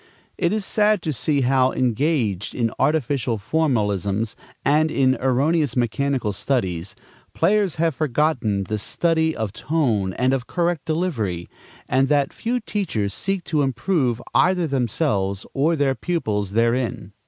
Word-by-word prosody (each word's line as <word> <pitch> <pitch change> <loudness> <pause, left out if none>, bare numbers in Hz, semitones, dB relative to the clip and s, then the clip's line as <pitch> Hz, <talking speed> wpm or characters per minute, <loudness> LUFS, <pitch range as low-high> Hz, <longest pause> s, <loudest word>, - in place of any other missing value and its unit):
It - - 0
is 210 -2 -1
sad 210 -3 +2
to 155 - -1
see 145 +2 +1
how, 130 0 +3
engaged 120 - 0
in 115 -2 0
artificial 135 -4 +1
formalisms 105 - 0 0.3
and 155 +3 +3
in 130 -3 +3
erroneous 140 +2 +1
mechanical 125 -1 0
studies, 95 -9 -2 0.4
players 205 -4 +2
have 165 0 +1
forgotten 130 -8 0
the 105 +2 -3
study 160 - +1
of 110 -3 -3
tone 115 - 0
and 130 +5 +1
of 125 -2 -2
correct 175 -3 -1
delivery, 120 - -2 0.4
and 135 +1 +2
that 145 -1 +1
few 245 +2 -2
teachers 180 - -2
seek 195 -2 -2
to 155 -3 0
improve 130 -1 0
either 180 -2 +3
themselves 120 - -1
or 155 +5 +2
their 140 -3 +2
pupils 110 - -2
therein. 115 -3 0
135 Hz, 135 wpm, -22 LUFS, 110-160 Hz, 0.4 s, how